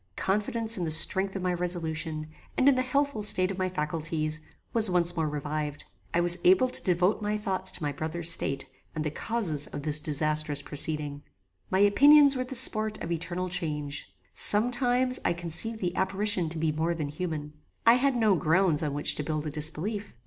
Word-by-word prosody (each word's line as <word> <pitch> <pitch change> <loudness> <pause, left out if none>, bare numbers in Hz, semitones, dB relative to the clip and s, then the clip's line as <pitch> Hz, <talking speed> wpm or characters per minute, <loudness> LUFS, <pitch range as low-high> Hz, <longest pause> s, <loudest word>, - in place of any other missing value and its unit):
Confidence 220 +2 0
in - - -3
the 165 - -3
strength 190 +5 +1
of 190 - -5
my 180 -1 -1
resolution, 165 -3 -3 0.3
and 260 - +2
in 280 - +6
the 255 - 0
healthful 275 -2 -2
state 185 -2 +2
of 190 - -7
my 185 0 -1
faculties, 155 -1 -3 0.3
was 225 -3 +5
once 175 -1 +2
more 160 -2 -2
revived. 150 0 -5 0.3
I 175 - 0
was 175 0 +1
able 190 +8 +4
to - - +4
devote 180 +3 0
my 210 0 -2
thoughts 190 -3 -1
to - - -4
my 145 - -2
brother's 160 +3 -1
state, 135 -4 +2 0.3
and 155 - -3
the 150 - -3
causes 170 -7 -2
of 145 - -8
this 150 0 +2
disasterous 150 0 0
proceeding. 145 -1 +2 0.5
My 190 - 0
opinions 280 +7 +5
were 255 - -2
the 265 - -5
sport 215 -3 +3
of 170 - -7
eternal 175 +2 -4
change. 150 -5 -4 0.2
Some 215 +4 +3
times 250 +1 +1
I - - 0
conceived 175 +7 +3
the 180 -1 -3
apparition 190 -2 +1
to 165 - -7
be 160 0 -1
more 160 +3 -2
than 150 -3 -5
human. 150 -1 -6 0.3
I 230 - +7
had 260 +2 +1
no 220 -4 +2
grounds 165 -1 +1
on 145 -3 -3
which 145 - +1
to 150 - -4
build 155 0 -4
a 150 - -4
disbelief. 160 - -3
175 Hz, 195 wpm, -26 LUFS, 155-210 Hz, 0.5 s, I